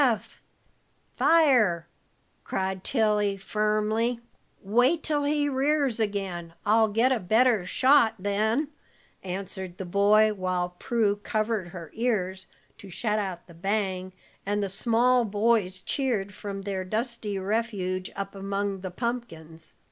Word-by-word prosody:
"Fire, 260 - +4
Eph!" 170 +1 -18 0.5
cried 190 -1 -3
Tilly, 210 -4 +1
firmly. 215 +3 0 0.4
"Wait 245 - +2
till 295 -2 0
he 290 0 +1
rears 275 -2 +1
again. 190 -6 -3
I'll 220 +1 +4
get 225 +5 +2
a 255 - +2
better 220 0 +3
shot, 260 -3 +4
then," 215 +9 0 0.5
answered 190 -1 -6
the 190 - -5
boy, 210 +4 +4
while 185 -2 -1
Prue 215 -4 +1
covered 215 -2 -1
her 170 -3 -9
ears 190 -5 -1 0.3
to 195 - -11
shut 210 +4 -1
out 190 -4 -4
the 170 - -15
bang, 190 0 -2 0.3
and 205 +1 -1
the 200 - -2
small 240 +5 +3
boys 205 -3 +1
cheered 210 -4 -1
from 195 0 -6
their 195 -2 -3
dusty 215 0 -3
refuge 190 -2 -2
up 195 0 -5
among 195 0 -2
the 185 0 -5
pumpkins. 175 -8 -5
205 Hz, 125 wpm, -27 LUFS, 190-235 Hz, 0.5 s, Fire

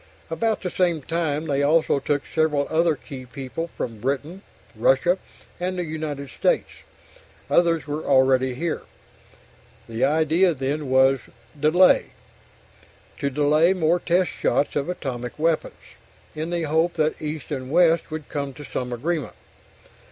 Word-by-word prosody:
About 215 +7 0
the 180 - -2
same 170 -5 +1
time, 160 -1 -1
they 140 -2 0
also 150 0 +3
took 145 0 -1
several 155 -3 +1
other 165 0 +3
key 130 -2 -10
people 135 +5 -5
from 115 -3 -4
Britain, 145 - -3 0.3
Russia, - - +3 0.4
and 185 +1 -2
the 180 - -1
United 155 -3 -5
States. - - +1 0.8
Others 170 -2 +3
were 150 +1 -4
already 130 -1 +3
here. 165 +4 -2 1.1
The 115 +1 -3
idea 160 +4 +3
then 140 +2 -2
was 130 +1 +4 0.4
delay 165 +5 +5 1.1
to 140 - 0
delay 150 +5 +3
more 175 -1 +2
test 175 +1 +1
shots 145 - 0
of 145 +3 -1
atomic 125 -8 -5
weapons, 160 +1 0 0.6
in 155 +2 -4
the 170 -1 -1
hope 160 +3 +1
that 155 -1 0
East 155 -1 -5
and 130 -3 -4
West 165 +2 +3
would 155 -1 -6
come 140 -2 -4
to 150 - -9
some 125 -2 -4
agreement. 150 +5 -2
155 Hz, 140 wpm, -23 LUFS, 140-170 Hz, 1.1 s, delay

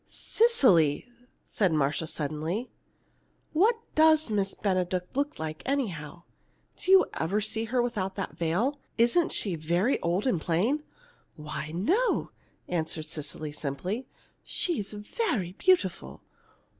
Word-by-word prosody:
"Cecily," 225 - +3 0.4
said 195 -5 +1
Marcia, 155 +1 0
suddenly, 160 - -3 0.8
"what 415 +9 +4 0.2
does 315 -4 +4
Miss 195 -2 0
Benedict 185 -1 -1
look 285 +2 -1
like, 155 0 -5
anyhow? 175 - -3 0.5
Do - - -4
you 380 0 +8
ever 180 +6 +1
see 220 +1 -1
her 240 +2 +1
without 200 -6 -2
that 195 - -4
veil? 205 - 0 0.2
Isn't 240 +9 +3
she 195 - 0
very 170 - +1
old 175 +4 0
and 190 -11 +1
plain?" 210 - +1 0.5
"Why, 150 0 -6
no," 380 - +1 0.4
answered 160 -2 -2
Cecily, 155 -1 -5
simply. 155 - -4 0.4
"She's 310 - -1
very 210 - -2
beautiful." 370 - +1
195 Hz, 120 wpm, -28 LUFS, 160-260 Hz, 0.8 s, you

